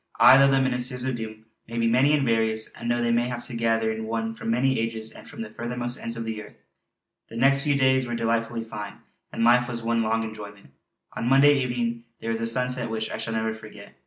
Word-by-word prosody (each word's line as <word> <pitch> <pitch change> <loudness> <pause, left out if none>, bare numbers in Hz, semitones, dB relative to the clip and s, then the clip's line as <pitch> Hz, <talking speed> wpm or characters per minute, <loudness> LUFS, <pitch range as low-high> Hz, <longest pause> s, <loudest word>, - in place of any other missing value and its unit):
Aye! 130 +2 +9
though 135 0 +6
the 135 0 +3
Ministers 125 -1 -1
of 130 -1 -1
the 115 - -4
Doom 110 0 -14 0.2
may 115 +1 -6
be 115 - +1
many 130 +6 +4
and 140 -2 0
various, 110 -2 0
and 120 - -6
though 120 0 +1
they 120 - +1
may 120 +1 +2
have 120 -1 -5
to 125 - -9
gather 115 -1 +1
in 110 0 -4
one 115 0 -2
from 115 - -6
many 130 +3 +2
ages 115 -1 -3
and - - -13
from - - -7
the 105 - -9
furthermost 120 +1 -3
ends 115 0 -4
of 115 - -3
the 110 -1 -4
earth!_" 105 - -13 0.7
The 115 - -8
next 135 +3 +4
few 145 -1 +1
days 130 -1 +3
were 120 - -3
delightfully 115 0 -1
fine, 105 -2 -7 0.4
and - - -2
life 120 +1 +5
was 120 -1 -4
one 115 0 +1
long 115 0 0
enjoyment. 105 -6 -9 0.4
On 120 - -2
Monday 140 +2 +6
evening 120 -2 -2
there 115 - -3
was 115 0 -2
a 115 - -1
sunset 125 0 0
which 110 0 -3
I - - -4
shall 110 0 -3
never 110 0 -1
forget. 110 -2 -12
115 Hz, 245 wpm, -25 LUFS, 110-125 Hz, 0.7 s, Aye